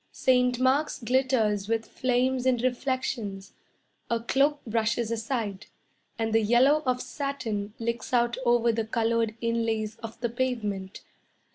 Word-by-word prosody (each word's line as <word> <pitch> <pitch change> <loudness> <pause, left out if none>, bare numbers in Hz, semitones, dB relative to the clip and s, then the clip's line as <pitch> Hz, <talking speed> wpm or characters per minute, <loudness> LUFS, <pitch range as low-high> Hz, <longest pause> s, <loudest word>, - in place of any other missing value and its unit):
Saint 250 -1 +2
Mark's 270 +4 +2
glitters 230 -5 +1
with 225 0 0
flames 255 0 0
and 245 -2 +2
reflections. 245 -6 -2 0.6
A 235 - +1
cloak 280 +5 +2
brushes 230 0 0
aside, 225 -4 -3 0.5
And 225 -1 -1
the 225 - +4
yellow 250 +8 +4
of 250 0 +1
satin 225 -8 -4
Licks 235 +1 -3
out 240 -1 +2
over 240 -1 +3
the 225 0 -1
coloured 230 -1 0
inlays 225 -2 -1
of 225 -1 -9
the 235 0 -1
pavement. 220 -6 -3
235 Hz, 130 wpm, -27 LUFS, 225-255 Hz, 0.6 s, the